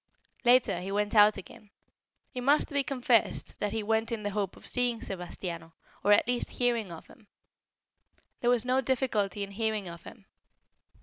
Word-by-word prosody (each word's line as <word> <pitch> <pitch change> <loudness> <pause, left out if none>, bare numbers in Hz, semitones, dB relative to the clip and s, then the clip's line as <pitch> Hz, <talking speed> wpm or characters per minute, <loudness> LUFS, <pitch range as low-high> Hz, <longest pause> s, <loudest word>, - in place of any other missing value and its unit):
Later 245 -7 +4
he 190 +2 -5
went 205 +1 -1
out 210 -1 +6
again. 200 +2 -12 0.6
It 250 - -4
must 285 +4 +3
be 280 -1 +1
confessed 250 -4 +1
that 205 - -1
he 220 0 -2
went 225 +2 0
in 225 -2 -3
the 205 - -2
hope 200 -2 -3
of - - -14
seeing 245 -2 +1
Sebastiano, 175 -3 -6 0.3
or 205 - +3
at 205 - +5
least 245 -1 -1
hearing 235 -6 0
of 165 - -10
him. 220 -4 -19 1.1
There 240 - +1
was 245 -1 +3
no 255 +1 +2
difficulty 225 -6 -1
in 200 - -7
hearing 215 -1 -2
of 170 0 -9
him. 195 - -13
220 Hz, 175 wpm, -29 LUFS, 200-245 Hz, 1.1 s, out